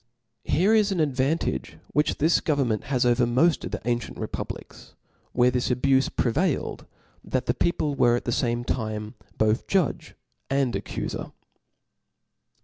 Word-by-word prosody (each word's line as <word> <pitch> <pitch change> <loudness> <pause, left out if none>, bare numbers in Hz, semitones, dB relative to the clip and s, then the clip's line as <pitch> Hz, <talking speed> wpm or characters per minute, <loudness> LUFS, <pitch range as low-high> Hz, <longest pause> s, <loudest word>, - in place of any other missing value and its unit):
Here 190 +7 +3
is 215 -2 +4
an 185 - -1
advantage 145 +1 0
which 150 0 +1
this 160 +3 +3
government 135 -8 0
has 130 -3 +1
over 120 0 +3
moft 155 +7 +2
of - - -4
the - - -6
ancient 120 0 -2
republics, - - -7 0.4
where 125 0 +3
this 125 -1 0
abufe 130 +2 +2
prevailed, 145 +6 0 0.4
that 130 -1 -2
the 120 - +1
people 150 0 0
w^ 120 -2 +4
at - - -7
the 120 - 0
fame 120 -1 0
time 110 -2 -3 0.2
both 110 +1 +1
judge 190 -6 0 0.3
and 135 -3 +1
accufer. - - -4
130 Hz, 140 wpm, -25 LUFS, 120-150 Hz, 0.4 s, is